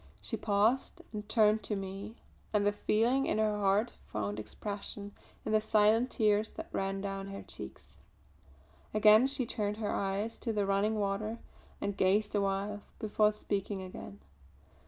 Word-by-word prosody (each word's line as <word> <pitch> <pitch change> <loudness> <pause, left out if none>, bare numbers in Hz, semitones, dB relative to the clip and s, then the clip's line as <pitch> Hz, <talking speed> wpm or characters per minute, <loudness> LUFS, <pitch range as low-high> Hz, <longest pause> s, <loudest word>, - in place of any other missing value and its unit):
She - - -3
paused 215 +4 +1
and 210 0 -6
turned 215 -1 +4
to 205 +1 -2
me 195 +3 -6 0.4
and 205 -1 +3
the 205 - +4
feeling 235 +6 +2
in - - +1
her 215 -1 +2
heart 205 +3 +2
found 105 0 -3
expression 200 - -5 0.3
in - - -1
the 215 0 +4
silent 220 +3 +4
tears 215 -2 +2
that - - -7
ran 195 0 -1
down 195 -1 -4
her 195 0 -7
cheeks. 65 0 -10 1.0
Again 215 +3 +7
she 270 -2 0
turned 210 -2 -2
her 215 -2 -2
eyes 200 +3 -1
to 230 - -2
the 205 -2 0
running 200 +2 +2
water 210 +2 -1 0.4
and 200 - -2
gazed 205 +3 +2
awhile 200 0 0 0.2
before 215 -1 +2
speaking 200 -2 -3
again. 185 - -9
210 Hz, 155 wpm, -32 LUFS, 195-215 Hz, 1.0 s, Again